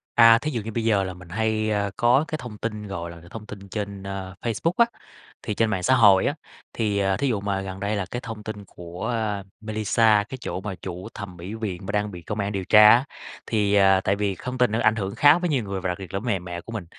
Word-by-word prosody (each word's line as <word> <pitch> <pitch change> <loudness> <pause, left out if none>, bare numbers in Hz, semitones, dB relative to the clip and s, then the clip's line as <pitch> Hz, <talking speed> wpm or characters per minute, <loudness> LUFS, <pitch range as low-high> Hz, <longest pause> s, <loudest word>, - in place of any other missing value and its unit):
À, 115 -1 +8
thí 150 +5 -3
dụ 120 -5 -2
như 110 +2 -6
bây 115 +1 -2
giờ 105 -3 +3
là 95 -1 -4
mình 90 -1 -14
hay, 110 +2 0
ơ, 100 -1 0
có 125 +5 +4
cái 155 - -3
thông 120 -4 -8
tin, 105 -2 -4
gọi 85 -3 -5
là, 85 -1 -12
thông 110 -2 -8
tin 100 -2 -10
trên, 100 -1 -5
ơ, 95 -1 -6
Facebook 120 +8 0
á, 235 - +6 0.6
thì 105 - -2
trên 115 +1 +1
mạng 95 -4 -2
xã 130 +8 +4
hội 100 -6 +6
á, - - 0 0.4
thì, 105 -3 0
ờ, 95 -1 +1
thí 140 - 0
dụ 115 -6 0
mà 100 -1 -1
gần 95 -1 -6
đây 100 +2 -1
là 100 -2 -2
cái 120 - -3
thông 110 -4 -7
tin 105 -2 -7
của, 90 -1 -7
a, 110 -4 -1 0.2
Mailisa, 110 0 +2
cái 130 - -6
chỗ 95 - -4
mà 95 -1 -5
chủ 90 +1 -7
thầm 95 -3 -8
mỹ 90 +5 -7
viện 100 -5 -5
mà 95 - -3
đang 105 0 -1
bị 90 -2 -9
công 105 +5 -5
an 100 0 -1
điều 95 -2 -3
tra 105 +2 +8
á, 120 +4 +6 0.4
thì, 105 -2 +1
ờ, 95 -1 +5
tại 100 - +2
vì 100 -1 -1
không 125 +7 -6
tin 125 -3 +3
là 110 - 0
nó - - -1
ảnh 110 - +4
hưởng 100 -1 -3
khá 145 +6 +6
với 175 0 -1
nhiều 135 -6 +1
người 100 -2 -4
và 95 - -2
đặc 90 - -2
biệt 95 -3 -9
là 95 - 0
với 115 - -7
mẹ 100 -5 +1
mẹ 85 -1 -7
của 115 - -11
mình. 110 -6 -5
105 Hz, 285 wpm, -24 LUFS, 95-115 Hz, 0.6 s, À